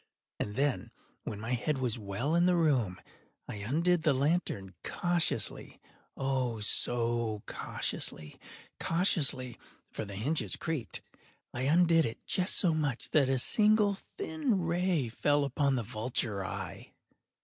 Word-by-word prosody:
And 105 - -3
then, 140 0 0 0.4
when 105 - -5
my 110 +3 -4
head 125 +4 0
was 125 -3 -1
well 105 +9 -2
in 170 +1 +4
the 180 - +4
room, 130 - +1 0.5
I - - -6
undid 160 - +1
the 155 -3 +3
lantern 135 - 0
cautiously—oh, 135 -5 -2
so 115 0 0
cautiously—cautiously 135 - -1 0.3
(for - - -4
the 100 -2 -7
hinges 140 +11 0
creaked)—I 125 -3 -6
undid 165 +2 +4
it 115 - -8
just 185 +1 +2
so 175 -4 +3
much 145 -6 -2
that 140 -4 +4
a 135 - +2
single 210 - +3 0.2
thin 310 - 0
ray 170 -4 +1
fell 145 +5 +2
upon 140 0 +1
the 120 - -1
vulture 110 -2 -1
eye. 95 - -6
135 Hz, 125 wpm, -31 LUFS, 115-170 Hz, 0.5 s, in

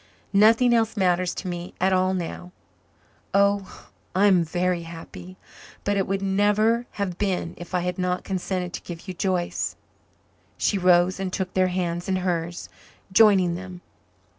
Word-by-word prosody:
Nothing 225 +4 +5
else 225 -1 +1
matters 180 -2 +1
to 190 - -5
me 175 0 -6
at 190 +1 +2
all 185 0 +2
now. 180 0 -5 0.8
Oh, 200 -1 +1 0.3
I 195 +2 +4
am 185 -4 +5
very 175 +2 -1
happy 170 +2 -10 0.5
but 205 - 0
it 195 -1 0
would 195 0 -1
never 210 +4 +2
have 190 -4 -3
been 185 -4 -1
if 175 +1 -7
I 180 - +1
had 180 +1 -3
not 180 0 -1
consented 185 -1 -3
to - - -5
give 175 +2 -9
you 185 - -4
Joyce." 180 -1 -1 0.8
She 200 - +1
rose 180 +1 +4
and 190 -1 -3
took 185 0 -3
their 185 0 +3
hands 175 -1 -2
in 190 - +1
hers, 175 -2 -2 0.5
joining 190 -5 +5
them. 180 0 -8
185 Hz, 160 wpm, -24 LUFS, 175-195 Hz, 0.8 s, Nothing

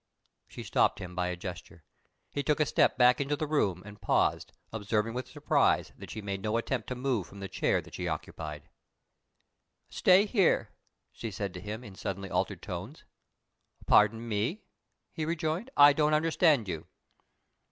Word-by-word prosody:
She - - -9
stopped - - +2
him 90 -1 -7
by 90 0 -1
a 90 - -2
gesture. 90 -2 -8 0.5
He 145 - -2
took 150 +1 +1
a 150 - +4
step - - +2
back 125 +1 +5
into 140 +1 0
the 155 - -2
room, 100 - 0
and 105 0 -12
paused, - - +1 0.2
observing 110 +1 -1
with 125 0 -4
surprise - - +1
that - - -11
she 110 - -6
made 100 -1 -4
no 110 +3 0
attempt 115 -1 -2
to 125 - -3
move 125 -8 -1
from 100 - -12
the 100 - -5
chair - - 0
that - - -16
she 90 - -4
occupied. 75 -1 -5 1.2
"Stay 190 +3 +5
here," 200 -4 +2 0.4
she 115 - -6
said 100 -2 -4
to 90 - -8
him, 110 +3 -6
in 105 - -10
suddenly 95 0 -5
altered - - -1
tones. - - -7 0.8
"Pardon 110 +2 +4
me," 115 - -1 0.5
he 160 - -3
rejoined, 165 +7 -2
"I 145 0 +9
don't 150 +1 +2
understand 155 - +3
you." 80 -4 -5
110 Hz, 170 wpm, -30 LUFS, 95-145 Hz, 1.2 s, I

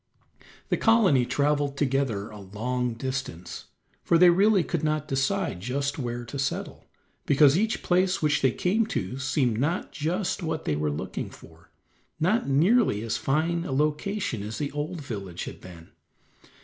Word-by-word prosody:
The - - +1
colony 195 - +4
traveled 145 +1 0
together 130 -8 0
a 105 - -10
long 115 +5 -3
distance, 130 -8 -5 0.4
for 170 - +3
they 175 +1 +7
really 195 +1 +4
could 165 -1 -3
not 155 -1 0
decide 135 - -1
just 140 +8 -2
where 120 -1 -4
to 125 +5 -6
settle, 135 - -3 0.4
because 145 0 +5
each 220 +5 0
place 185 +1 +2
which 150 -2 +1
they 130 - +4
came 210 - +1
to 115 - -3
seemed 130 -4 0
not 160 +7 -1
just 175 +6 -2
what 160 -2 -3
they 75 - 0
were 75 0 -1
looking 75 - -4
for, - - -16 0.5
not 185 +1 +1
nearly 160 - +3
as 115 - -1
fine 165 +5 0
a 160 - -5
location 150 - -1
as 105 +2 -5
the 145 - -3
old 150 +3 -4
village 100 -9 -6
had - - -8
been. 85 -2 -12
140 Hz, 160 wpm, -26 LUFS, 120-170 Hz, 0.5 s, they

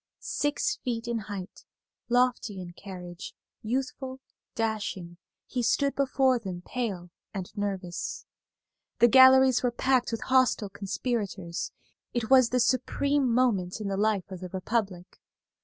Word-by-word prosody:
Six 290 +9 -1
feet 235 -2 -4
in 235 -1 -1
height, 200 -2 -8 0.5
lofty 245 -5 +1
in 175 -1 -8
carriage, 180 -2 -9 0.3
youthful, 260 +2 -3 0.4
dashing, 205 -6 -3 0.3
he 250 - -3
stood 280 +4 +2
before 265 -2 +2
them 185 -5 -6
pale 195 -9 -4 0.2
and 190 +1 -6
nervous. 195 -4 -4 0.7
The 240 - +6
galleries 260 0 +7
were 250 - +2
packed 250 +1 +1
with 230 - -3
hostile 255 -5 +2
conspirators. 200 -3 -3 0.4
It 235 0 -2
was 255 -3 +7
the 250 - +1
supreme 265 +2 +1
moment 220 -7 +1
in 210 -2 -3
the 195 - -1
life 205 -1 0
of 185 - -6
the 185 0 -7
Republic. 190 -1 -3
225 Hz, 130 wpm, -28 LUFS, 190-255 Hz, 0.7 s, galleries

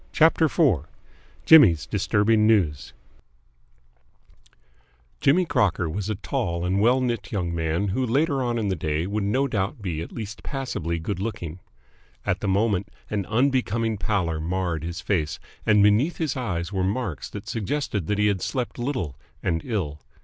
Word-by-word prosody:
CHAPTER 160 +1 +4
IV 130 - +2 0.6
JIMMY'S 105 - +7
DISTURBING 110 +1 +2
NEWS 90 -11 +1 2.3
Jimmy 175 +7 +4
Crocker 95 - +1
was 100 +5 -3
a 110 - 0
tall 95 -5 -2
and 95 +2 +1
well 125 +4 +4
knit 120 -5 -2
young 90 -5 -2
man 85 +4 -1
who 130 +7 0
later 140 +3 +1
on 120 -2 0
in 105 -3 -1
the 95 - 0
day 80 0 -1
would 100 +2 -2
no 130 +8 +1
doubt 105 +1 -2
be 85 -6 -3
at 85 - -7
least 110 -1 -7
passably 105 - -3
good 85 +3 -4
looking. 95 -6 -4 0.7
At - - 0
the - - -3
moment 100 0 +1 0.2
an 100 -3 -1
unbecoming 115 -3 +1
pallor 90 -8 0
marred 85 -1 -2
his 85 +1 -5
face, 80 -6 -1 0.3
and 105 -2 +5
beneath 110 +11 +3
his 160 -4 -1
eyes 95 -8 -3
were 95 -1 0
marks 95 - -2
that 105 0 -8
suggested 115 - -2
that 105 - 0
he 105 - +2
had 100 -3 +1
slept 125 -2 -3
little 120 - -2 0.3
and 80 -3 0
ill. 80 - -3
105 Hz, 160 wpm, -25 LUFS, 85-120 Hz, 2.3 s, JIMMY'S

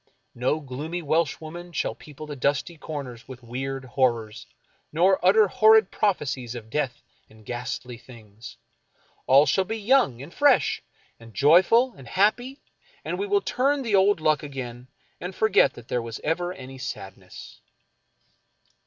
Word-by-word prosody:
No 130 +6 0
gloomy 150 +6 -5
Welsh 155 -1 0
woman 175 +2 -9
shall - - -2
people 150 0 -11
the 150 -1 -7
dusky 140 +5 -1
corners 140 -7 -7
with 130 -1 -11
weird 130 +3 -5
horrors, 115 -4 -1 0.4
nor 180 +4 +3
utter 205 +3 +5
horrid 220 +2 +5
prophecies 135 - -1
of 110 -2 -9
death 135 -4 -2 0.3
and 110 -1 -19
ghastly 125 0 -5
things. 115 -3 -13 0.7
All 135 +3 +6
shall 190 - +2
be 220 +4 -4
young, 220 - +2
and 155 - -12
fresh, 285 -3 +3 0.4
and 115 -3 -15
joyful, 185 - +5
and 135 - -13
happy, 245 - 0 0.4
and - - -3
we 405 - -2
will 405 0 +2
turn 275 -1 0
the 225 -4 -3
old 195 -1 +4
luck 155 -1 +2
again, 125 -4 -7 0.3
and 180 +1 -6
forget 220 0 +3
that 120 -1 -13
there 125 - -1
was 115 -1 -7
ever 175 +3 -1
any 135 -5 -10
sadness. 95 -7 -9
145 Hz, 150 wpm, -25 LUFS, 125-190 Hz, 0.7 s, All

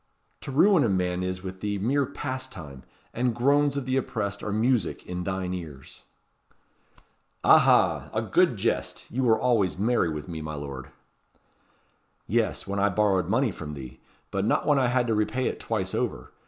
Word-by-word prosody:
To - - -7
ruin 170 +4 +5
a 115 - +2
man 90 -1 0
is 90 0 -3
with 95 0 -7
thee 105 -1 -1
mere 130 +7 +1
pastime; 130 - -6 0.3
and 120 -1 0
groans 140 +3 +2
of 140 - -3
the 130 0 0
oppressed 100 -5 -3
are 105 - -3
music 115 +2 0
in 90 0 -4
thine 95 -1 -2
ears." 75 -7 -9 1.4
"Aha! - - +5
a - - -1
good - - +3
jest. - - -2
You 130 - -1
were 110 -2 +4
always 115 -8 +1
merry 110 -3 +2
with 75 -1 -5
me, 80 -2 -6
my 75 0 -5
lord." 70 -2 -7 1.4
"Yes, - - 0
when 100 0 -3
I 100 +1 +3
borrowed 95 -3 +1
money 115 +2 +2
from 75 -4 -7
thee 65 -2 -9 0.3
but 95 - -1
not 105 - +1
when 145 -2 +4
I 130 - +3
had 125 0 +2
to 115 - 0
repay 110 +4 0
it - - -2
twice - - -2
over. - - -3
105 Hz, 175 wpm, -26 LUFS, 90-125 Hz, 1.4 s, ruin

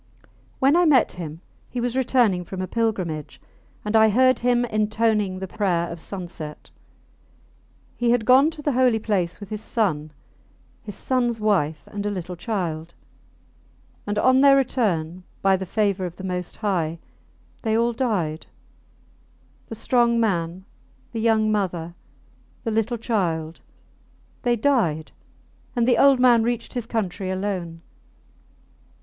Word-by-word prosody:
When 275 +4 +4
I 350 0 +4
met 280 -6 +4
him 165 -2 -8 0.3
he 250 - -4
was 240 0 -1
returning 240 -8 +2
from 185 +2 -7
a 185 - -1
pilgrimage, 185 -9 -2 0.5
and 210 +1 -1
I 220 0 +6
heard 255 +4 +4
him 245 0 +2
intoning 215 -3 0
the 190 0 -5
prayer 180 -4 0
of 170 - -7
sunset. 175 -6 -8 1.3
He 240 -1 +1
had 235 -2 +2
gone 265 +5 +6
to 305 -2 -9
the 290 - +1
holy 250 -3 +3
place 195 -6 -1
with 205 -2 -9
his 215 -1 -4
son, 155 -11 -1 0.7
his 205 -3 -7
sons 240 -3 0
wife, 160 -9 +1
and 205 0 -6
a 205 - -1
little 180 -3 -5
child; 170 -5 -4 1.1
and 205 0 -2
on 260 +4 +4
their 275 -1 +7
return, 185 -10 0 0.2
by 195 0 +5
the 190 0 -5
favour 200 -2 0
of 175 - -10
the 190 - -10
Most 180 -1 -3
High, 170 -6 -1 0.6
they 220 0 +1
all 235 +1 +2
died: 195 - -2 1.2
the 225 - -7
strong 235 +1 +2
man, 180 -4 -1 0.5
the 225 - -3
young 220 -1 +3
mother, 175 -5 -2 0.7
the 225 - -2
little 225 +2 0
child 170 -8 -2 0.8
they 240 -1 +2
died; 210 - +1 0.6
and 240 -1 +2
the 250 - +4
old 275 -2 +6
man 245 -2 +5
reached 235 0 -2
his 245 -3 -4
country 195 -4 -2
alone. 185 -4 -3
210 Hz, 145 wpm, -23 LUFS, 180-240 Hz, 1.3 s, their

